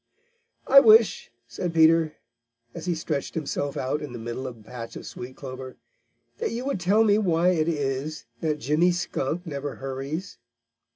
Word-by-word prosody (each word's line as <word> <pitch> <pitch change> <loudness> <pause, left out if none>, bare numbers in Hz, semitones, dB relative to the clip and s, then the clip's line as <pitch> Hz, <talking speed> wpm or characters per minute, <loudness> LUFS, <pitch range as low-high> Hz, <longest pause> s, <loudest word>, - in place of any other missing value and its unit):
"I 275 - +9
wish," 220 -6 +5 0.2
said 165 +8 -4
Peter, 160 -1 +5 0.6
as - - -7
he 175 - +1
stretched 155 -3 -3
himself 145 -2 -2
out 135 +4 -1
in 145 -4 -6
the - - -5
middle 120 +3 -5
of 125 - -7
the 110 - -18
patch 115 -2 -8
of - - -8
sweet 125 +1 -8
clover, 130 -1 -8 0.6
"that 465 - -1
you 240 +3 -4
would 275 -8 -1
tell 200 +5 +4
me 210 -1 +4
why 175 -3 +2
it 165 -3 +1
is 145 -1 -2
that 155 -2 -1
Jimmy 150 +5 +2
Skunk 175 -1 -2
never 145 -3 -4
hurries." 135 +6 -5
155 Hz, 170 wpm, -25 LUFS, 135-180 Hz, 0.6 s, I